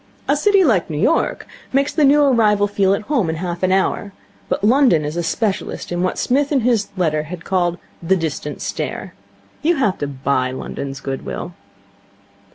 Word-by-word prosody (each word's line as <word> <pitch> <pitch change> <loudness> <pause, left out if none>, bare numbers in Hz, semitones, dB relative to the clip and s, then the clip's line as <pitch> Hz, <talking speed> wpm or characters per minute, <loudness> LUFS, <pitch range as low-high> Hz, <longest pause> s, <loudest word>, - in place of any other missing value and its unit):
A 285 - +3
city 395 +6 +4
like 220 - +2
New 150 - -3
York 325 - +1 0.3
makes 275 +2 +1
the 310 - +2
new 290 +1 +5
arrival 215 -7 +3
feel 195 -1 +2
at 210 - -6
home 245 - 0
in 160 - -1
half 175 +1 -4
an 185 0 +2
hour; 195 +1 0 0.4
but - - -1
London 230 - +4
is 150 +2 -4
a 175 - 0
specialist 195 +3 -2
in 175 0 -1
what 185 - -1
Psmith 280 +3 +1
in 275 -3 +2
his 225 -3 +1
letter 155 -4 +1
had 170 +3 -8
called 175 -2 0 0.2
the 175 +3 +2
Distant 155 -3 -4
Stare. - - -4 0.5
You 340 +3 +2
have 210 -10 0
to 145 - -2
buy 130 -1 -1
London's 135 +1 -6
good 135 -1 -4
will. 175 - -6
190 Hz, 185 wpm, -19 LUFS, 160-255 Hz, 0.5 s, new